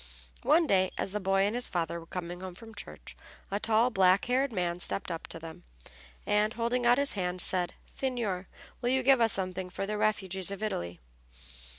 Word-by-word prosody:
One 325 +2 +4
day, 190 -8 +3
as - - -2
the 210 - -2
boy 195 0 +2
and 205 - 0
his 245 +1 0
father 170 -1 -2
were 165 - -13
coming 175 0 -6
home 185 -2 -7
from 225 +3 -12
church 205 - -9 0.4
a 200 - 0
tall, 225 +3 +3
black 190 -2 +4
haired 260 +2 +1
man 175 -4 -1
stepped 185 +1 -2
up 165 - -5
to - - -7
them, 165 0 -10 0.6
and, 210 +2 +2
holding 240 +1 0
out 245 +1 +6
his 280 0 +3
hand, 180 -2 -2
said, 180 -1 +1
"Signor, 225 -9 -3 0.3
will 245 - 0
you 260 0 +2
give 265 -1 +5
us 225 -1 +7
something 185 -1 0
for 195 - -4
the 210 +1 -3
refugees 190 -3 +1
of 200 +1 -5
Italy?" 85 - -3
195 Hz, 200 wpm, -30 LUFS, 180-235 Hz, 0.6 s, us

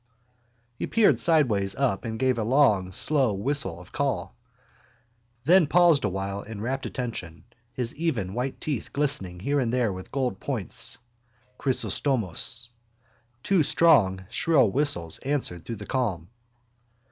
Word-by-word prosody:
He 120 - -5
peered 225 -2 +3
sideways 115 - +2
up 130 -7 -1
and 110 -1 -4
gave 130 -1 +1
a - - 0
long 110 -7 +3
slow 130 +3 +2
whistle 100 - -1
of 90 - -14
call, - - -2 1.1
then 170 +3 +5
paused 170 -3 +4
awhile 100 0 -3
in 110 -1 -9
rapt 130 +5 -3
attention, 110 -10 -6 0.3
his 125 -1 -3
even 130 - -2
white 125 +3 -3
teeth 145 -7 -4
glistening 135 -12 -2
here 140 +7 0
and 120 -4 0
there 120 -5 +1
with 95 0 -9
gold 130 -8 -2
points. - - -2 0.6
Chrysostomos. 120 - 0 0.7
Two 195 -4 +3
strong 115 - +3
shrill 130 -4 +3
whistles 90 - +1
answered 130 - -2
through 115 - -5
the 105 0 -9
calm. 100 -11 -2
125 Hz, 135 wpm, -26 LUFS, 95-140 Hz, 1.1 s, then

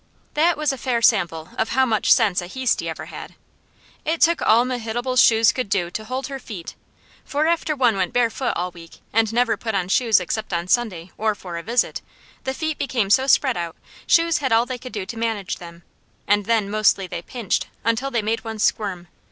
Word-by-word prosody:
That 330 +3 +3
was 300 -2 0
a 265 - -7
fair 235 -2 -1
sample 170 -8 +2
of 220 - +1
how 265 - +5
much 220 -4 +1
sense 205 -7 +4
a 175 - -7
Heasty 260 +5 -1
ever - - -6
had. - - -9 0.7
It 320 +1 -1
took 335 0 +3
all 235 +3 +4
Mehitabel's 245 0 0
shoes 225 -1 +5
could 255 -5 -4
do 175 -4 0
to 215 +4 -5
hold 255 +3 -3
her 270 0 -6
feet, 200 -9 -8 0.5
for 295 +2 -1
after 325 -2 +1
one 245 -6 +3
went 185 -2 -1
barefoot 245 +1 0
all 180 +1 -2
week, 170 -1 -14
and 225 0 +2
never 240 0 +2
put 220 -3 -3
on 185 -2 -1
shoes 225 -1 +4
except 205 +3 -4
on 170 +1 -1
Sunday 185 -6 0
or 215 0 +1
for 180 -4 -8
a - - -6
visit, 230 +7 0 0.4
the 265 - -1
feet 315 0 -3
became 235 -8 -1
so 265 +4 +4
spread 265 -2 +3
out, 170 -1 -4 0.3
shoes 335 -1 +4
had 265 -4 -1
all 225 +1 +4
they 250 0 -5
could 255 0 -9
do 205 -4 -3
to 225 +3 -7
manage 225 -4 -2
them, 170 -1 -12 0.4
and 205 0 +2
then 225 -2 +1
mostly 210 -2 +2
they 170 - -6
pinched 230 +2 -2 0.2
until 230 +4 0
they 235 -5 -1
made 220 +2 -1
one 225 -1 -5
squirm. 195 -4 -1
225 Hz, 210 wpm, -22 LUFS, 195-255 Hz, 0.7 s, how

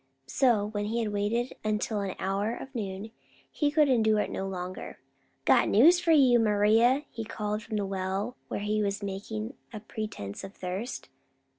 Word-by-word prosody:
So, 230 - +2
when 205 -1 -3
he 225 +3 -2
had 220 -3 -1
waited 220 +5 -1
until 215 0 -1
an 195 -2 -3
hour 200 +4 -1
of 270 - -9
noon, 205 -2 -5 0.4
he 295 - +1
could 300 0 +4
endure 220 -5 +3
it - - -3
no 195 - -3
longer. 185 -1 -6 0.5
"Got - - +5
news 325 - +6
for 345 - -3
you, 260 -6 +6
Maria," 225 +5 +4
he 225 - -5
called 210 -1 -3
from 215 0 -4
the 205 - -1
well, 195 +4 -2
where - - -4
he 210 +1 0
was 205 0 -1
making 215 +4 -4 0.2
a 215 - -6
pretense 210 - -6
of 195 +1 -9
thirst. 190 +7 -5
215 Hz, 175 wpm, -28 LUFS, 200-235 Hz, 0.5 s, news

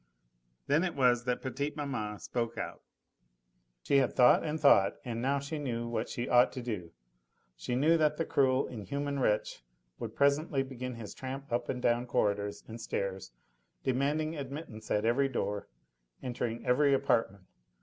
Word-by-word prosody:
Then 155 +4 +3
it 180 -4 -2
was 125 -3 +3
that 125 -1 -1
petite 140 +3 -3
maman 110 -8 -3
spoke 115 +1 -3
out. - - -5 1.0
She 140 - +3
had 135 -3 +2
thought 125 -1 +6
and 155 0 -2
thought, 120 -10 +5
and 115 -2 -3
now 135 +3 +1
she 140 +3 -4
knew 120 -4 -3
what 115 -1 -2
she 120 - -3
ought 125 0 +5
to 130 - -5
do; 100 -8 -4 0.6
she 125 - -3
knew 155 +6 +4
that 150 -1 +2
that 165 - 0
cruel, 135 -2 +2
inhuman 140 +5 -3
wretch 105 - 0 0.4
would - - -6
presently 140 0 +2
begin 125 -2 -6
his 110 -3 -8
tramp 135 0 -6
up 120 0 -1
and 125 -1 -3
down 120 +1 +2
corridors 100 -3 0
and 115 +1 -8
stairs, 95 - -3 0.5
demanding 145 +5 0
admittance 140 -6 -7
at 105 +1 +1
every 135 +4 +3
door, 105 -5 -2 0.6
entering 120 -2 -3
every 140 +2 +4
apartment. 115 -8 +1
125 Hz, 160 wpm, -31 LUFS, 115-140 Hz, 1.0 s, thought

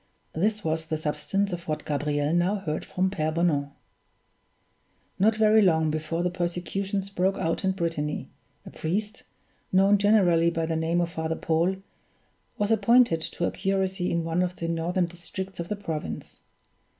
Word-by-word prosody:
This 210 +5 0
was 160 0 -1
the 160 -1 -1
substance 155 +6 -1
of 170 -1 -6
what 155 -1 -3
Gabriel 145 +1 0
now 175 +4 +2
heard 165 -7 -3
from 185 +1 -1
Pere 155 -4 -1
Bonan: 155 -4 +1 1.5
Not 215 +3 +4
very 215 0 +5
long 160 -5 +3
before 155 +2 -2
the 180 - 0
persecutions 185 +3 -2
broke 190 0 +1
out 165 +4 -1
in 190 0 +2
Brittany, 165 -5 -2 0.4
a - - -9
priest, 205 +6 -3 0.5
known 195 +2 +5
generally 185 -5 +4
by 165 -1 -1
the 160 0 -1
name 165 +2 +1
of 170 -1 -1
Father 160 0 -2
Paul, 165 +4 +1 0.8
was 205 +1 0
appointed 225 -4 +4
to 170 +2 -3
a - - 0
curacy 190 -1 -1
in 170 -1 0
one 165 +2 0
of 180 0 -1
the 165 - -4
northern 170 +2 0
districts 175 +2 -7
of 170 - -3
the 210 - -1
province. 165 -7 -5
175 Hz, 160 wpm, -26 LUFS, 160-195 Hz, 1.5 s, very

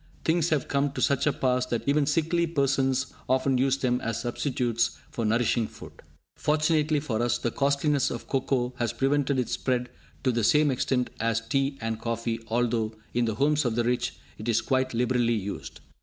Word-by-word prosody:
Things 165 0 +2
have 150 -4 0
come 140 0 0
to - - -5
such 140 +1 +2
a - - +4
pass 125 -2 0
that 120 0 -3
even 140 0 +3
sickly 165 +3 +1
persons 135 -4 +1 0.2
often 130 0 +2
use 135 +1 +2
them 125 -2 0
as 115 - -2
substitutes 120 -2 -1
for 115 - -2
nourishing 115 0 +2
food! - - -12 0.4
Fortunately 155 0 +2
for 120 -6 -2
us, 120 0 +1
the 120 - -2
costliness 140 +1 +1
of 120 - -6
cocoa 130 -2 0
has 120 -2 -1
prevented 140 0 +1
its 125 - -1
spread 125 -1 -1 0.3
to 130 - +3
the 115 -1 0
same 150 +5 +4
extent 125 0 0
as 115 0 0
tea 135 0 0
and 115 0 -3
coffee, 115 0 -2
although, 115 -1 0 0.2
in 120 0 +2
the 110 -2 -1
homes 150 +5 +2
of 120 -3 0
the 120 - +1
rich, 120 +1 0 0.2
it 110 +2 -4
is 115 - +3
quite 130 -2 0
liberally 120 -1 +2
used. 100 -1 -5
130 Hz, 185 wpm, -27 LUFS, 120-140 Hz, 0.4 s, a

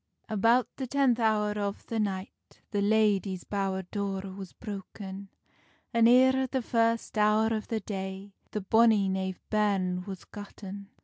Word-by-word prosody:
About 230 +3 +3
the 265 - -3
tenth 260 -2 +2
hour 215 -2 +2
of 205 -1 -3
the 230 - -3
night, 195 -2 -2 0.4
The 205 - 0
ladie's 200 -3 +2
bowr 195 -2 -2
door 195 -2 -3
was 195 -2 -8
broken, 200 -2 -8 0.6
An 230 -1 +5
eer 260 +2 +5
the 260 0 -2
first 230 -1 +1
hour 215 +1 +3
of 215 -1 -3
the 225 -2 -2
day 190 0 -6 0.2
The 210 - -3
bonny 220 0 +4
knave 190 -1 -2
bairn 195 -4 +1
was 195 -2 -7
gotten. 200 -1 -9
205 Hz, 145 wpm, -29 LUFS, 195-225 Hz, 0.6 s, An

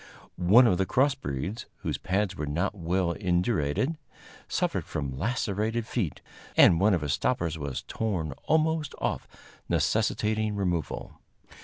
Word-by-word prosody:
One 100 +8 +6
of 95 -6 +3
the 95 - +1
cross 135 +2 +3
breeds, 95 - -4
whose - - -2
pads 95 0 0
were 75 -5 -4
not 85 +8 0
well 90 -1 0
indurated, 90 - 0 0.5
suffered - - 0
from 70 -3 -4
lacerated 110 - -1
feet, 100 - -2 0.4
and 85 - +7
one 100 +1 +4
of 85 - -2
his 75 -2 0
stoppers 85 - 0
was 70 -3 -4
torn 90 -9 -2 0.2
almost 160 -1 +1
off, - - -2 0.4
necessitating 110 0 +1
removal. 90 -5 -2
95 Hz, 135 wpm, -28 LUFS, 85-115 Hz, 0.5 s, and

